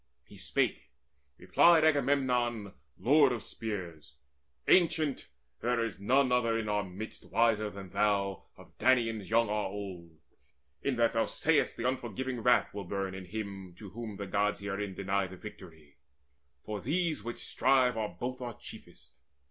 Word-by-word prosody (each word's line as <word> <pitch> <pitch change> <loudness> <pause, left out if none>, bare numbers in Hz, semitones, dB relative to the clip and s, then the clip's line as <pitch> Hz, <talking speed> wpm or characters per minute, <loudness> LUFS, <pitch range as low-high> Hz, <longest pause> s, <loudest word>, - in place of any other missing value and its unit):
He - - -15
spake: - - -1 0.5
replied 170 -2 +5
Agamemnon 125 -8 +1 0.2
lord 140 +1 +5
of 120 -3 -3
spears: 85 -10 -6 0.5
"Ancient, 160 -5 +3 0.3
there 120 -1 +1
is 110 -4 -6
none 130 +6 +3
other 115 -2 +2
in 110 -1 -3
our 105 -1 +1
midst 95 +4 -8
Wiser 110 -2 +2
than 100 -2 -10
thou, 100 -1 0
of - - -16
Danaans 115 -6 +2
young 115 +1 +3
or 105 0 0
old, 95 -5 -7 0.6
In 140 - 0
that 115 -1 +2
thou 115 -1 +1
say'st 160 -1 +1
that 120 - -1
unforgiving 130 0 -3
wrath 125 +1 +3
Will 100 -1 -5
burn 95 +1 -3
in 95 -1 -7
him 95 -2 -6
to 100 -2 -11
whom 110 0 -6
the 100 - -4
Gods 100 +2 0
herein 100 -1 -4
Deny 100 0 0
the 95 0 -11
victory; 80 -8 -12 0.7
for 105 -2 -4
these 160 - 0
which 120 +1 -5
strive 130 -2 +2
Are 110 -2 -1
both 130 +1 -4
our 120 -3 -5
chiefest. - - -12
110 Hz, 155 wpm, -31 LUFS, 100-125 Hz, 0.7 s, replied